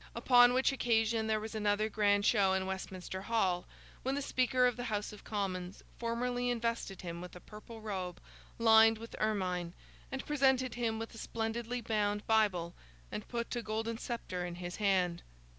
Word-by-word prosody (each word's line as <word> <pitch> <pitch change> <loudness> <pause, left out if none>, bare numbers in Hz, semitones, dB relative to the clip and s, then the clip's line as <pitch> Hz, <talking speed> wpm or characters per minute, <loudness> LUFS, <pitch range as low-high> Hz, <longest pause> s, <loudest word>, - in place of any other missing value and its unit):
Upon 245 -1 +6
which 260 +2 +3
occasion 225 -3 +1
there 215 -1 +1
was 220 +1 -6
another 210 0 +1
grand 205 -2 +2
show 200 -4 +4
in 190 0 0
Westminster 190 0 -5
Hall, 190 -5 0 0.3
when 265 +1 -1
the 285 - -1
Speaker 255 -1 +2
of 245 -2 +2
the 245 - -5
House 210 -2 -2
of 210 - -12
Commons 190 -3 -3 0.2
formally 245 +1 -1
invested 230 -5 -2
him 170 -1 -5
with 180 0 -9
a - - -8
purple 215 +3 -11
robe 190 -5 -4 0.4
lined 225 -1 +6
with 230 +1 -9
ermine, 180 -5 -1 0.4
and 265 - -4
presented 265 -4 +2
him 230 -2 -1
with 225 +1 -6
a 225 - -9
splendidly 230 +2 -3
bound 210 -2 0
Bible, 195 -6 +2 0.4
and 210 - -5
put 235 0 -3
a 240 - -1
golden 225 +1 -3
sceptre 185 -7 -4
in 175 -1 -4
his 175 0 -6
hand. 185 -4 +1
220 Hz, 175 wpm, -33 LUFS, 190-235 Hz, 0.4 s, Upon